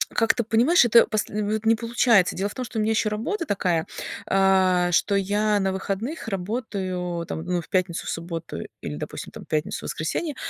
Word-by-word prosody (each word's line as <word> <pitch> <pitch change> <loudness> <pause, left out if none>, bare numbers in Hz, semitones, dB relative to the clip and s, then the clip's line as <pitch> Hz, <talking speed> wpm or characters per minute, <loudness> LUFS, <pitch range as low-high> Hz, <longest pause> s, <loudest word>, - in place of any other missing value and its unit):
Как 225 -1 +3
ты 235 - -1
понимаешь, 240 +8 +4
это 235 0 +6
посл 215 -2 -2
в 215 - -1
вот 215 +1 -2
не 225 +1 +5
получается. 230 -3 +3
Дело 195 +2 -1
в - - -9
том, 255 - -3
что 225 -2 -4
у - - +2
меня 215 +1 +1
еще 220 -1 +1
работа 255 - -2
такая, 180 - 0 0.4
а, 190 -2 +3
что 200 - +2
я 205 +2 +1
на 190 -1 0
выходных 210 +8 -4
работаю, 185 -4 -3
там, 160 - -5
ну, 180 -1 -1
в - - -15
пятницу, 180 -2 0
в - - -2
субботу 165 - -5 0.2
или, 75 - -5
допустим, 75 - -6
там - - -10
пятницу, 155 0 -2
воскресенье. 280 - -3
200 Hz, 200 wpm, -24 LUFS, 180-225 Hz, 0.4 s, это